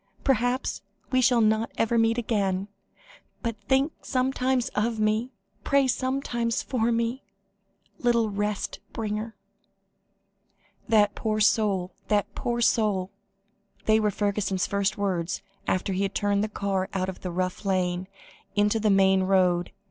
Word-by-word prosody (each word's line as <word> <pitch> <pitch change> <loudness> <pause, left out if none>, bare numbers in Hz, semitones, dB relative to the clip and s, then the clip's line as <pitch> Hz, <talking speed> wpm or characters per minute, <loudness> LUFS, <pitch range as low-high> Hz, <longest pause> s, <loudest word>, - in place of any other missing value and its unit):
Perhaps, 255 -1 +1 0.3
we 255 -1 +3
shall 245 -1 +4
not 220 +1 +2
ever 225 +1 +1
meet 225 0 +3
again 200 -4 0 0.7
but 230 -2 -1
think 270 +4 +2
sometimes 255 -1 0
of 220 +1 -1
me 215 +4 +1 0.3
pray 280 -1 +3
sometimes 255 -2 -1
for 235 -2 0
me 235 +3 -1 0.8
little 235 -3 +2
rest 205 0 -2
bringer." 220 0 -3 1.5
"That 210 -2 +4
poor 215 -1 -1
soul! 205 -4 +2
that 205 -1 +1
poor 240 0 -2
soul!" 205 -5 +2 0.7
They 220 0 +4
were 210 -1 +2
Fergusson's 200 -2 0
first 200 +1 0
words 185 -3 -2 0.2
after 190 +1 0
he 185 - -1
had 195 0 -1
turned 205 0 +1
the 215 - -2
car 195 -2 -2
out 185 -1 0
of 190 - -6
the 185 - -4
rough 185 +2 -2
lane, 185 -2 0 0.5
into 210 +2 +2
the 215 0 +2
main 190 -1 +4
road. 185 -2 +2
215 Hz, 135 wpm, -26 LUFS, 195-235 Hz, 1.5 s, shall